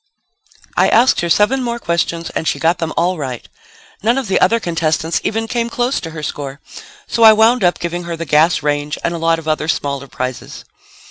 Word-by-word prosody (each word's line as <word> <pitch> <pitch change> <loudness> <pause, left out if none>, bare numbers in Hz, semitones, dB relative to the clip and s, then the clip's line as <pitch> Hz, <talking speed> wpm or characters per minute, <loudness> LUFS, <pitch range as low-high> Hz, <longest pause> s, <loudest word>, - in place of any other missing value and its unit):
I - - +3
asked 245 +3 +4
her 170 - -2
seven 210 +9 +3
more 235 -1 -2
questions 170 -4 -2
and 160 - -3
she - - 0
got 165 +2 +1
them 165 -1 -2
all 180 0 +1
right. 130 -4 -5 0.5
None 235 +5 +2
of 265 -6 -3
the 190 - +1
other 230 - +4
contestants 165 -3 -1
even 225 +1 -2
came 235 0 -2
close 245 +3 -1
to 165 - -7
her 160 -1 -8
score, 140 -1 -5 0.5
so 230 - -3
I 220 -1 +9
wound 225 +2 +3
up 175 0 +3
giving 175 0 -4
her 170 -1 -5
the 165 - -5
gas 155 +2 +3
range 145 0 -1
and 170 - -1
a 170 - -4
lot 165 0 +2
of 160 -1 -9
other 155 0 -1
smaller 140 -3 -2
prizes. 130 -1 -6
170 Hz, 210 wpm, -17 LUFS, 155-220 Hz, 0.5 s, I